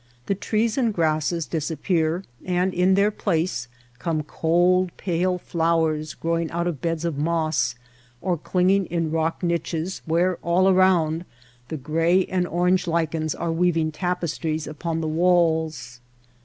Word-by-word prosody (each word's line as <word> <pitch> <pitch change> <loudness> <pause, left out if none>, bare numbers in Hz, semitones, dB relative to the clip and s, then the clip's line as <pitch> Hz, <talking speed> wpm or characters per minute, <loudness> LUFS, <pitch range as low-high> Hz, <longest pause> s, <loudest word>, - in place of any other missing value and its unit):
The - - +1
trees 215 +4 0
and 235 -3 +2
grasses 160 -2 0
disappear, 160 +4 -1 0.2
and 180 +1 0
in 185 +2 +3
their 200 +2 +3
place 165 - -1 0.3
come 155 +4 -1
cold 175 +4 +2
pale 180 0 0
flowers 160 -3 0
growing 165 0 -1
out 170 +1 -2
of 170 -6 -3
beds 165 -1 -1
of 160 -4 -2
moss, 155 -5 0 0.4
or 180 +4 0
cling 180 +3 +1
ing 195 -1 +2
in 165 -2 -1
rock 165 +2 -1
niches 170 +1 -2
where 175 +2 +2
all 175 +2 +2
around 180 -4 +3 0.4
the 160 - -4
gray 165 +6 +2
and 180 -1 -1
orange 180 +2 +1
lichens 160 -2 -1
are 170 0 -2
weaving 165 -2 +1
tapestries 165 -2 -2
upon 165 +2 -3
the 160 - -2
walls. 160 -6 +1
170 Hz, 140 wpm, -24 LUFS, 160-180 Hz, 0.4 s, in